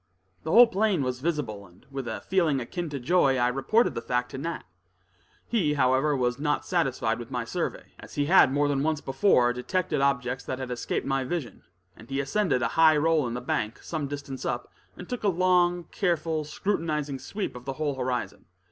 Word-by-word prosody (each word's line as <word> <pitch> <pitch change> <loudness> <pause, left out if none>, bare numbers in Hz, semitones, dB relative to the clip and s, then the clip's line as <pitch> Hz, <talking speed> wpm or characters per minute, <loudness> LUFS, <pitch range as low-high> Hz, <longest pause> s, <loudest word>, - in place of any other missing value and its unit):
The 160 - -6
whole 235 +8 +9
plain 200 -7 +1
was 125 -1 -2
visible, 130 - -3
and 90 +1 -22
with 135 -3 -5
a 110 - -4
feeling 170 -7 +1
akin 165 +7 -4
to 140 -2 -4
joy, 135 -1 +3
I 120 0 +3
reported 135 - +2
the - - -4
fact 125 0 -1
to 130 - -6
Nat. 165 +4 -4 0.8
He, 170 -11 +1
however, 135 +2 +2
was 125 0 0
not 150 0 0
satisfied - - 0
with - - -8
my - - -3
survey, - - -4
as - - -12
he 145 - +1
had 165 -4 +6
more 145 +1 +2
than 140 -1 0
once 155 0 0
before 135 -4 +3
detected 155 +4 -1
objects 130 -2 0
that 130 - -3
had 130 -1 -5
escaped 120 - -2
my 135 -1 0
vision, 135 -2 -4 0.3
and 110 - -15
he 135 0 -2
ascended 140 -1 +1
a 115 - +1
high 160 +1 +5
roll 155 -3 +2
in 120 - -4
the 125 - -4
bank, 110 -2 -2
some 155 -4 -3
distance 140 -2 -6
up, 120 0 -3 0.3
and 180 - -9
took 245 - -4
a - - +2
long, 180 -1 +3
careful, 165 -5 0
scrutinizing 150 -5 -2
sweep 200 -4 -5
of 125 0 -10
the 135 - -3
whole 150 0 -2
horizon. 125 -2 -3
145 Hz, 200 wpm, -27 LUFS, 130-170 Hz, 0.8 s, whole